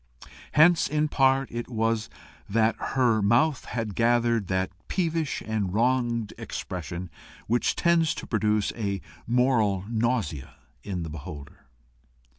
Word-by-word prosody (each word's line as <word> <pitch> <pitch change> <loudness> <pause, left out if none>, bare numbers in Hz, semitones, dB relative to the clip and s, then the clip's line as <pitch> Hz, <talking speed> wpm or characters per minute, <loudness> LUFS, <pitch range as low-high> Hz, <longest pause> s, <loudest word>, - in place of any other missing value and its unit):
Hence 160 +3 +5
in 150 0 0
part 135 -1 +2
it 120 0 -4
was 115 -1 0 0.4
that 110 +2 +2 0.2
her 115 -4 +3
mouth 120 +8 +2
had 115 -4 -3
gathered 115 -2 +2
that 95 +1 -1 0.2
peevish 165 -5 -1
and 105 -4 -2
wronged 120 -2 +1
expression 90 0 -5 0.3
which 120 +2 +1
tends 170 -2 +2
to - - -6
produce 105 -2 +1
a 100 -4 -2 0.3
moral 115 -6 +2
nausea 110 - -1 0.3
in 90 -4 -4
the 80 - -5
beholder. 70 -2 -9
115 Hz, 120 wpm, -26 LUFS, 100-130 Hz, 0.4 s, Hence